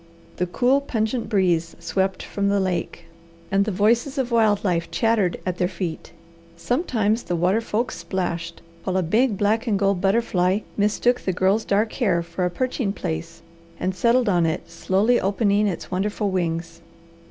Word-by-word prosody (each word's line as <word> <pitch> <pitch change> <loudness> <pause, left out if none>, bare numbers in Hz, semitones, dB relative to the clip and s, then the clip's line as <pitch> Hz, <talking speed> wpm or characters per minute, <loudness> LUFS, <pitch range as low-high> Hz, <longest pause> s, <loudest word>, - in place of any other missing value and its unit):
The 180 - 0
cool, 255 +9 +2
pungent 225 -3 -2
breeze 175 -6 +1
swept 190 +3 -1
from 200 0 -1
the 200 0 +2
lake, 180 -2 -2 0.5
and 195 0 +3
the 215 - -1
voices 230 +8 +1
of 255 -2 -1
wild 215 -3 +3
life 170 -4 0
chattered 220 -6 +1
at 180 -1 -3
their 180 - +2
feet. 175 -3 -5 0.5
Sometimes 230 - 0
the 175 - -3
water 180 +6 +2
folks 230 0 -2
splashed, 170 -1 -4 0.2
while 185 -1 -1
a 185 - +1
big 220 +6 +2
black 220 +4 +1
and 210 -3 +2
gold 195 -2 +1
butterfly 195 -2 +2
mistook 215 +4 +1
the 190 - -1
Girl's 190 +5 +1
dark 210 +2 +1
hair 185 -9 +1
for 170 +2 -3
a - - +1
perching 250 +2 -1
place 165 -2 -5 0.4
and 185 - -1
settled 235 +4 +2
on 175 -4 +3
it, 160 - -3
slowly 215 +6 +2
opening 205 +1 +2
its 185 -2 -4
wonderful 200 +2 -1
wings. 170 -2 -2
195 Hz, 165 wpm, -23 LUFS, 180-220 Hz, 0.5 s, and